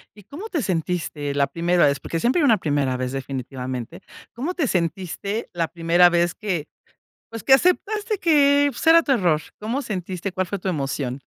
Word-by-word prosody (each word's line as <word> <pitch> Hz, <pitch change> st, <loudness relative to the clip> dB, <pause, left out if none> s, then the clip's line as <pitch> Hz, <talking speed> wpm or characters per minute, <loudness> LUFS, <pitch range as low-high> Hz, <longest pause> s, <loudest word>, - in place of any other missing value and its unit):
¿Y 205 Hz, -, -15 dB
cómo 330 Hz, -, -9 dB
te 320 Hz, -7 st, -1 dB
sentiste 165 Hz, -6 st, -2 dB
la 140 Hz, -1 st, +2 dB
primera 170 Hz, +3 st, +2 dB
vez? 140 Hz, -1 st, +1 dB
Porque 165 Hz, -, -4 dB
siempre 255 Hz, -, +2 dB
hay -, -, +3 dB
una 225 Hz, -5 st, +5 dB
primera 145 Hz, -6 st, 0 dB
vez, 130 Hz, 0 st, -3 dB
definitivamente. 130 Hz, +2 st, -5 dB, 0.3 s
¿Cómo 290 Hz, +10 st, -3 dB
te 315 Hz, -8 st, -1 dB
sentiste 190 Hz, +5 st, -2 dB
la 165 Hz, -2 st, -1 dB
primera 175 Hz, +1 st, +4 dB
vez 175 Hz, 0 st, +1 dB
que, 180 Hz, -8 st, -3 dB, 0.6 s
pues, 230 Hz, -2 st, -8 dB
que 265 Hz, -, +5 dB
aceptaste 415 Hz, -, +2 dB
que, 285 Hz, -4 st, +4 dB
pues, 250 Hz, -, -7 dB
era 330 Hz, 0 st, +7 dB
tu 280 Hz, -, -1 dB
error? 175 Hz, -10 st, +2 dB, 0.2 s
¿Cómo 235 Hz, +7 st, -2 dB
sentiste? 185 Hz, -3 st, -4 dB
¿Cuál 185 Hz, 0 st, -2 dB
fue 200 Hz, -, -3 dB
tu 190 Hz, -, -3 dB
emoción? 135 Hz, -4 st, -3 dB
180 Hz, 185 wpm, -22 LUFS, -, 0.6 s, era